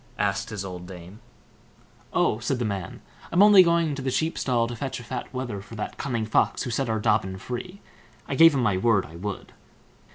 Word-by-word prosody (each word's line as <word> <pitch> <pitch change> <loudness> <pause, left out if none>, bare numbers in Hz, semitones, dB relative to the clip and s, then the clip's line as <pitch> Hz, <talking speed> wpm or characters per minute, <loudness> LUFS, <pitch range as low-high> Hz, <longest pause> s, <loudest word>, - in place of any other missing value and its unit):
asked - - -1
his 100 -2 -5
old 90 -1 -7
dame. 90 +2 -11 0.9
"Oh!" 110 - +1
said 125 +3 -1
the 120 - -2
man, 100 -4 -5 0.3
"I'm 180 +4 +5
only 205 -2 +9
going 170 -3 +2
to 140 - -5
the 130 - -1
sheep 160 +6 0
stall 120 -3 +1
to 120 +1 -5
fetch 135 +3 -4
a - - -10
fat 125 +1 -6
wether 120 -6 -4
for 105 +3 -12
that 105 - -6
cunning 120 -5 -2
Fox, 110 - +1
who 125 - -4
set 125 +1 -1
our 110 - 0
Dobbin 105 -3 +1
free. 180 - -7 0.5
I - - -3
gave 165 +2 +7
him 130 - +1
my 100 -5 +2
word 100 0 +2
I 80 - -13
would." 100 +2 -6
120 Hz, 215 wpm, -25 LUFS, 100-135 Hz, 0.9 s, only